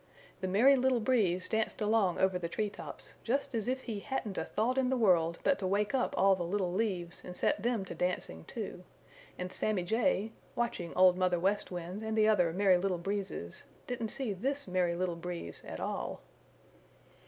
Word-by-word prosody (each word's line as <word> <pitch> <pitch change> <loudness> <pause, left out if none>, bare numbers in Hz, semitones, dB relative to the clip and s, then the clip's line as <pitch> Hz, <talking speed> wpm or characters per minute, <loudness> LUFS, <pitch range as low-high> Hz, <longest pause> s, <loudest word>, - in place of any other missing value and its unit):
The 185 - -2
Merry 235 +9 +6
Little 260 -1 +2
Breeze 205 -7 +2
danced 220 0 -1
along 210 -4 +2
over 190 -1 +2
the 170 -1 -3
tree 210 +3 -1
tops - - -9
just 275 +3 -1
as 225 -1 -1
if 260 +1 0
he 220 -4 -4
hadn't 215 -3 -3
a - - -2
thought 240 +6 0
in 255 -1 +2
the 260 - +1
world 170 -7 +3
but 185 - +3
to 190 - -1
wake 205 +4 +1
up 260 -2 +1
all 195 0 +5
the 185 - -6
little 180 +1 -1
leaves 185 -4 -2
and 180 - -8
set - - +1
them 230 -3 0
to - - -6
dancing 180 - -2
too, - - -6 0.5
and 180 0 -4
Sammy 210 -4 0
Jay, 225 +1 +1 0.2
watching 200 -8 -2
Old 185 0 +6
Mother 180 -1 +2
West 195 +4 +1
Wind 180 +3 -5
and 220 0 -2
the 215 0 +5
other 180 -6 +4
Merry 185 0 +4
Little 185 -1 0
Breezes, 190 - -4 0.2
didn't 235 -3 -3
see 240 -2 -1
this 275 +8 -2
Merry 180 -2 +1
Little 180 -1 -1
Breeze 170 - -6
at - - -7
all. - - -3
195 Hz, 195 wpm, -32 LUFS, 180-225 Hz, 0.5 s, Merry